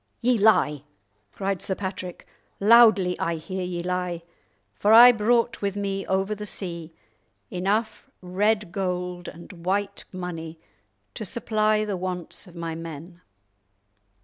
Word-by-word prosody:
"Ye 250 +1 +2
lie," 150 -9 +3 0.5
cried 195 - -3
Sir 190 - -2
Patrick, 185 -2 -6 0.3
"loudly 205 -4 +6
I 170 - -1
hear 175 +4 -5
ye 175 -1 -4
lie, 180 -1 -2 0.5
for 210 - +2
I 240 +2 +10
brought 230 +1 +1
with 200 0 -2
me 195 -1 -3
over 190 +2 0
the 210 0 -6
sea 170 -5 -5 0.6
enough 205 +5 -1
red 205 +2 0
gold 180 -2 -3
and 170 0 -11
white 195 +2 -1
money 170 -3 -6 0.5
to - - -6
supply 215 0 0
the 205 -3 -3
wants 180 -1 -5
of 175 - -15
my 165 -1 -4
men. 165 +2 -9
185 Hz, 130 wpm, -25 LUFS, 175-210 Hz, 0.6 s, I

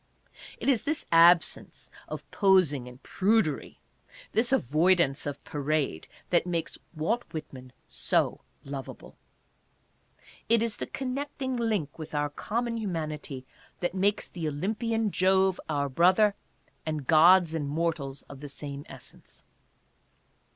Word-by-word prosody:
It - - -6
is 260 -5 +4
this 310 +1 -2
absence 170 +1 +4 0.2
of - - -7
posing 185 - +3
and 125 +2 -13
prudery, 200 -6 0 0.5
this 235 +3 +1
avoidance 155 - +2
of 145 - -5
parade, 145 - -2 0.2
that 175 0 +3
makes 170 -2 -3 0.2
Walt 215 +11 0
Whitman 130 -5 -8
so - - +1 0.2
lovable. 135 -2 -8 1.3
It 230 0 +4
is 230 -2 -2
the - - -4
connecting 265 0 -4
link 215 - -2
with 155 -1 -7
our 145 0 0
common 230 +8 -2
humanity 155 - -4 0.3
that 175 0 -1
makes 200 +2 0
the 170 -3 -5
Olympian 215 +8 -1
Jove 190 0 +3
our 145 -2 0
brother, 185 +9 +4 0.5
and 155 -3 -3
gods 170 +2 +6
and 150 -3 -2
mortals 150 -3 -2
of 140 - -12
the 145 0 -8
same 140 0 -6
essence. - - -12
170 Hz, 125 wpm, -28 LUFS, 145-210 Hz, 1.3 s, gods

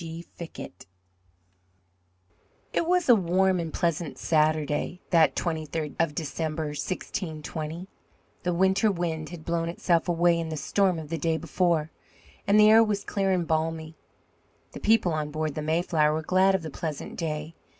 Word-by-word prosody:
G. 165 +1 -7
FICKETT 165 - -9 1.9
It 330 - 0
was 360 -1 +2
a 245 - +8
warm 190 -1 +2
and 165 -2 -3
pleasant 170 -3 -1
Saturday 155 +1 +1
that 165 -3 +4
twenty 160 -3 -2
third 150 0 -4
of 165 -3 +1
December, 155 0 -3
1620. 160 +1 -5 0.5
The 180 - -1
winter 190 +4 +3
wind 165 -4 -3
had 170 -3 -10
blown 165 0 -1
itself 170 0 +1
away 170 0 +3
in 165 -1 -3
the 155 - -4
storm 185 +5 +1
of 155 -2 -7
the 165 0 -3
day 160 +1 +1
before, 165 -1 0 0.6
and 205 +2 +5
the 210 0 +7
air 225 +1 +8
was 205 -2 -1
clear 195 -1 0
and 180 -2 +1
balmy. 160 0 -1 0.8
The - - -8
people 210 -6 +3
on 155 -1 -2
board 155 0 -2
the 155 - -4
Mayflower 155 -1 +1
were 160 +1 -2
glad 190 +3 +3
of 190 - -2
the 160 - -6
pleasant 155 -1 -5
day. 155 -1 -4
165 Hz, 160 wpm, -27 LUFS, 155-180 Hz, 1.9 s, a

